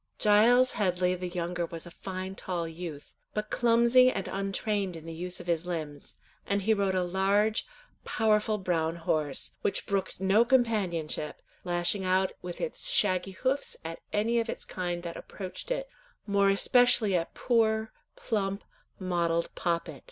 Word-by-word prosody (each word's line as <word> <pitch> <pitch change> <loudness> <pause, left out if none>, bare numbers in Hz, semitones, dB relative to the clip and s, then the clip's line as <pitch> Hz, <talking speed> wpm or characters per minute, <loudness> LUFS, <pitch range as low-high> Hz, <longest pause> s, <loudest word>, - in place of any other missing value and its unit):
Giles 235 +5 +5
Headley 180 -2 +1
the 180 0 -4
younger 175 -1 -3
was 165 0 -7
a 175 - -10
fine 190 +1 -6
tall 175 -3 -3
youth, 165 -3 -8 0.2
but 210 0 -3
clumsy 235 +2 +5
and 195 -6 -3
untrained 195 -1 -2
in 160 -1 -10
the 165 - -6
use 180 +2 -3
of 175 - -9
his 170 0 -1
limbs, 155 -5 -5 0.3
and 200 0 0
he 220 +3 +4
rode 200 -2 0
a 185 - +2
large, 200 +4 +1 0.4
powerful 215 -1 +1
brown 165 -4 0
horse, 155 -4 -1
which - - -1
brooked 195 -1 -2
no 195 +4 +4
companionship, 205 - 0 0.2
lashing 175 +2 0
out 185 0 +2
with 175 -1 -7
its - - -2
shaggy 185 - +2
hoofs 265 +7 -1
at 165 0 -5
any 230 +3 +1
of 230 0 -2
its - - -5
kind 175 -1 -3
that 170 -1 -6
approached 190 - -8
it, - - -2 0.4
more 200 -1 +3
especially 230 0 +4
at 170 -1 -2
poor, 220 -2 +1 0.2
plump, 200 -2 -2 0.3
mottled 170 -3 0
Poppet. 170 -4 -2
190 Hz, 155 wpm, -29 LUFS, 175-215 Hz, 0.4 s, Giles